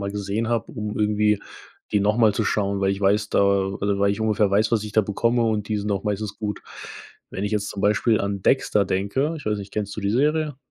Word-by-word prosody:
mal 100 Hz, 0 st, -3 dB
gesehen 105 Hz, +3 st, -2 dB
habe, 115 Hz, -3 st, -1 dB
um 105 Hz, 0 st, -5 dB
irgendwie 105 Hz, -1 st, +2 dB, 0.5 s
die 105 Hz, -, +3 dB
noch 105 Hz, +3 st, +1 dB
mal 110 Hz, -3 st, +4 dB
zu 110 Hz, -, 0 dB
schauen, 100 Hz, -1 st, 0 dB
weil 95 Hz, 0 st, +2 dB
ich 100 Hz, -, -3 dB
weiß 100 Hz, +2 st, +2 dB
da -, -, +3 dB
oder 100 Hz, 0 st, +1 dB
weil 100 Hz, 0 st, +3 dB
ich 100 Hz, -, -3 dB
ungefähr 105 Hz, -2 st, +2 dB
weiß, 105 Hz, +3 st, +2 dB
was 110 Hz, -2 st, +1 dB
ich 105 Hz, -, -7 dB
da 110 Hz, -, +5 dB
bekomme 115 Hz, +4 st, 0 dB
und 110 Hz, -2 st, -1 dB
die 105 Hz, -1 st, 0 dB
sind 105 Hz, +1 st, -3 dB
auch 100 Hz, +1 st, -1 dB
meistens 105 Hz, 0 st, -3 dB
gut. 105 Hz, -1 st, -4 dB, 0.7 s
Wenn 95 Hz, -, -5 dB
ich 105 Hz, +1 st, -2 dB
jetzt 105 Hz, -1 st, -1 dB
zum 100 Hz, -, -6 dB
Beispiel 105 Hz, +2 st, +2 dB
an 100 Hz, -1 st, -3 dB
Dexter 105 Hz, -6 st, +2 dB
denke 100 Hz, -, -1 dB
ich 145 Hz, -, -11 dB
weiß 105 Hz, -1 st, 0 dB
nicht, 100 Hz, -1 st, -9 dB
kennst 105 Hz, -1 st, -3 dB
du -, -, -3 dB
die 100 Hz, 0 st, -1 dB
Serie? 150 Hz, +3 st, +1 dB
105 Hz, 245 wpm, -23 LUFS, 100-110 Hz, 0.7 s, da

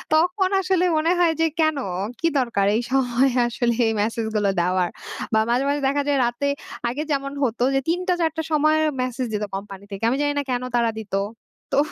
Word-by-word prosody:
তখন 360 Hz, +4 st, +2 dB
আসলে 365 Hz, -1 st, +1 dB
মনে 325 Hz, +3 st, +2 dB
হয় 335 Hz, -2 st, +4 dB
যে -, -, +5 dB
"কেন? 315 Hz, -2 st, +3 dB, 0.4 s
কি 330 Hz, -, +2 dB
দরকার 230 Hz, -6 st, +1 dB
এই 235 Hz, -, +1 dB
সময়ে 260 Hz, 0 st, +2 dB
আসলে 240 Hz, 0 st, 0 dB
এই -, -, +2 dB
মেসেজগুলো 220 Hz, -2 st, 0 dB
দেওয়ার?" 180 Hz, 0 st, +1 dB, 0.4 s
বা 220 Hz, -, +5 dB
মাঝে, 250 Hz, +3 st, +2 dB
মাঝে 290 Hz, 0 st, 0 dB
দেখা 285 Hz, +1 st, +1 dB
যায় 285 Hz, -1 st, +2 dB
রাতে 240 Hz, +4 st, -1 dB, 0.4 s
আগে 290 Hz, +5 st, -3 dB
যেমন 275 Hz, -1 st, -1 dB
হতো 240 Hz, -1 st, 0 dB
যে, -, -, +4 dB
০৩ঃ০০-০৪ঃ০০ 345 Hz, -2 st, 0 dB
সময় 310 Hz, +1 st, +3 dB, 0.2 s
মেসেজ 255 Hz, 0 st, -2 dB
দিত 210 Hz, 0 st, -1 dB
কোম্পানি 195 Hz, 0 st, -7 dB
থেকে। 195 Hz, +3 st, -7 dB
আমি 265 Hz, -, 0 dB
জানি 290 Hz, 0 st, +1 dB
না -, -, -1 dB
কেন 250 Hz, 0 st, -1 dB
তারা 235 Hz, -1 st, +3 dB
দিত? 215 Hz, -2 st, -10 dB, 0.6 s
তো -, -, +1 dB
265 Hz, 185 wpm, -23 LUFS, 230-310 Hz, 0.6 s, যে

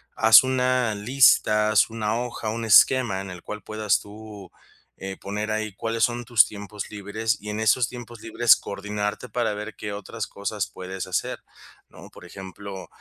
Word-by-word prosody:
haz 110 Hz, +2 st, +7 dB
una 125 Hz, -3 st, +1 dB
lista, 105 Hz, -2 st, +3 dB
haz 110 Hz, +1 st, +4 dB
una 110 Hz, -1 st, -2 dB
hoja, 120 Hz, -3 st, -5 dB
un 115 Hz, +2 st, -4 dB
esquema 115 Hz, -1 st, +5 dB
en 95 Hz, 0 st, -7 dB
el 90 Hz, -1 st, -9 dB
cual 105 Hz, 0 st, -7 dB
puedas 110 Hz, -1 st, 0 dB
tú, 105 Hz, -2 st, -12 dB, 0.5 s
eh, 95 Hz, 0 st, -7 dB
poner 105 Hz, +2 st, -4 dB
ahí 110 Hz, -1 st, -3 dB
cuáles 115 Hz, +2 st, 0 dB
son 120 Hz, 0 st, -4 dB
tus 120 Hz, -1 st, +5 dB
tiempos 105 Hz, 0 st, -8 dB
libres 110 Hz, +2 st, -3 dB
y 105 Hz, -, -7 dB
en 105 Hz, +1 st, -4 dB
esos 115 Hz, +2 st, +2 dB
tiempos 120 Hz, -2 st, -10 dB
libres 115 Hz, +1 st, +4 dB
coordinarte 105 Hz, +3 st, -5 dB
para 120 Hz, -3 st, -1 dB
ver 105 Hz, +1 st, -7 dB
qué 105 Hz, -, -6 dB
otras 105 Hz, +2 st, -6 dB
cosas 100 Hz, -1 st, -4 dB
puedes 95 Hz, 0 st, -6 dB
hacer, 95 Hz, -2 st, -2 dB, 0.5 s
¿no? -, -, -14 dB
Por -, -, -15 dB
ejemplo, 95 Hz, 0 st, -9 dB
105 Hz, 170 wpm, -24 LUFS, 100-115 Hz, 0.5 s, haz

